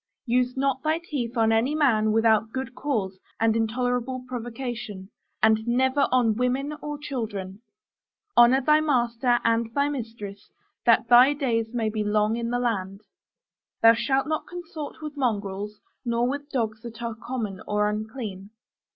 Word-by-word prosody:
Use 250 +1 +1
not 270 -1 0
thy 310 +1 +1
teeth 265 -8 -4
on 225 -1 +3
any 235 +7 +2
man 220 -8 +3
without 220 0 +3
good 260 0 -4
cause 210 -10 -2 0.2
and 225 0 +3
intolerable 245 +3 -1
provocation; 235 -5 -6 0.3
and 220 +1 +4
never 260 +3 +2
on 245 -3 +3
women 250 +5 -1
or 295 0 -4
children. 215 -9 -5 0.7
Honor 240 +3 +6
thy 305 +3 +4
master 245 -4 +2
and 230 0 +1
thy 285 +1 +2
mistress, 225 -7 -7 0.4
that 230 0 +5
thy 250 +4 +7
days 230 -6 -1
may 220 -2 0
be 215 0 -1
long 210 +1 +1
in 235 0 -2
the 245 - 0
land. 200 -5 -2 0.8
Thou 230 0 +9
shalt 265 +3 +1
not 310 0 -2
consort 320 -4 -8
with 300 -1 -6
mongrels, 210 -5 -2 0.2
nor 235 -1 +1
with 285 +2 -4
dogs 225 -5 -2
that 235 0 -9
are 230 -1 -2
common 220 -3 -5
or 210 0 +1
unclean. 210 -2 -5
235 Hz, 150 wpm, -25 LUFS, 220-260 Hz, 0.8 s, Thou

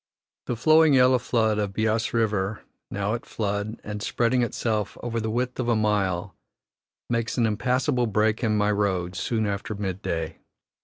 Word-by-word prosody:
The 120 - -1
flowing 155 +4 +5
yellow 130 0 +5
flood 110 -3 +1
of 100 -2 -2
Beas 110 +1 0
River, 105 -3 0 0.3
now 100 +1 -2
at 120 - -3
flood, 105 0 -3
and 105 -1 -5
spreading 120 +3 +1
itself 110 -3 -1
over 115 -1 -2
the 110 0 -2
width 125 +3 -2
of 120 -1 0
a 120 - +3
mile, 100 -3 0 0.7
makes 115 0 -1
an 120 - +3
impassable 125 +3 +1
break 110 +2 +1
in 110 -2 +2
my 105 0 +2
road 95 -3 0
soon 110 +4 -1
after 100 +1 -3
mid 95 -2 -4
day. 80 -3 -3
110 Hz, 165 wpm, -25 LUFS, 100-120 Hz, 0.7 s, flowing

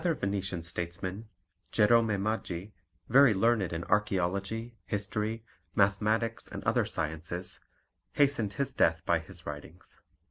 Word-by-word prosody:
Another 170 -3 +2
Venetian 95 -3 -2
statesman, 90 +4 -4 0.4
Jerome 115 +1 +5
Maggi, 100 -2 -2 0.3
very 135 -2 +6
learned 105 -2 +2
in 85 0 -3
archaeology, 100 +4 0
history, 105 +2 -2 0.3
mathematics, 110 +3 +1
and - - -7
other - - +2
sciences, 80 +4 -3 0.5
hastened 135 -8 +2
his 140 +7 -1
death 80 0 +2
by 85 -1 +3
his 85 +1 -6
writings. 75 +5 -9
100 Hz, 115 wpm, -30 LUFS, 90-115 Hz, 0.5 s, very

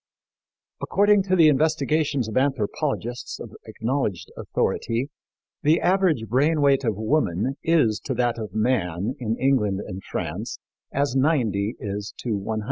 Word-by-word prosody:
According 205 0 +3
to 185 -1 +2
the 165 -3 +6
investigations 150 -2 +1
of 110 - -6
anthropologists 130 -1 -1
of - - -8 0.2
acknowledged 115 -6 -2
authority, 120 +5 -1 0.5
the 155 +3 +4
average 180 -10 +2
brain 145 +7 +2
weight 140 -1 +3
of 110 -4 0
woman 110 - 0
is 150 -10 +2
to 130 - -2
that 120 -1 0
of 105 -4 -6
man 110 -3 0
in 115 -2 -2
England 115 -8 +1
and 95 -2 -6
France - - -4 0.3
as 140 -2 0
90 120 - +1
is 100 0 -5
to 115 -4 -2
100. 110 +2 -3
130 Hz, 135 wpm, -24 LUFS, 110-150 Hz, 0.5 s, the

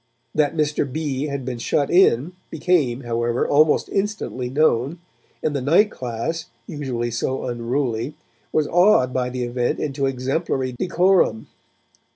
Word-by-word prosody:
That 150 0 +1
Mr. 150 -2 0
B. 145 -2 -2
had 140 -3 -4
been 125 -2 -4
shut 140 +4 0
in 175 -4 +4 0.2
became, 140 -9 +1
however, 120 0 -1
almost 150 +1 +3
instantly 195 - -2
known, 140 +1 +1 0.5
and 150 -2 0
the 140 - -1
night 170 +11 +4
class, 130 +7 -4 0.2
usually 130 -7 -3
so 130 +3 -2
unruly, 120 +2 -2 0.4
was 155 -1 +1
awed 175 -8 +4
by 125 -1 0
the 125 0 -3
event 120 0 -1
into 135 -2 -1
exemplary 135 +1 -1
decorum. 175 - +2
135 Hz, 135 wpm, -22 LUFS, 125-155 Hz, 0.5 s, in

